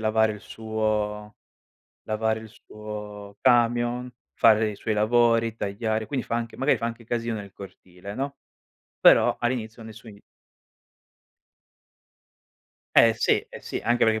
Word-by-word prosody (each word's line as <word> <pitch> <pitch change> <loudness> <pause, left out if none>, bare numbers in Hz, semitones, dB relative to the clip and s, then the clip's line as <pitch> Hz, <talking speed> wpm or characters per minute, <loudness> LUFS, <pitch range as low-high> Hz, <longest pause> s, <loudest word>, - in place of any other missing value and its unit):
lavare 110 0 +2
il 105 - -10
suo 105 -1 -3 0.7
lavare 110 +1 -1
il 110 - -11
suo 105 -2 -9
camion, 120 0 +2 0.3
fare 110 -1 +4
i 105 - -7
suoi 110 +2 -2
lavori, 115 +1 +2
tagliare, 110 +1 -2
quindi 135 -3 -3
fa 115 - -3
anche 115 -1 -4
magari 135 +3 +2
fa 115 - -3
anche 115 0 -6
casino 115 -1 -2
nel 100 -1 -9
cortile, 95 0 -11
no. 140 +4 -4 0.6
Però - - +5
all'inizio 115 -2 -3
nessun 110 0 -11
gli 100 - -15 2.8
Eh 115 -1 +7
sì, 115 - +2
eh - - -10
sì, - - -5
anche 120 +1 +3
perché 110 0 +2
110 Hz, 135 wpm, -25 LUFS, 105-115 Hz, 2.8 s, Eh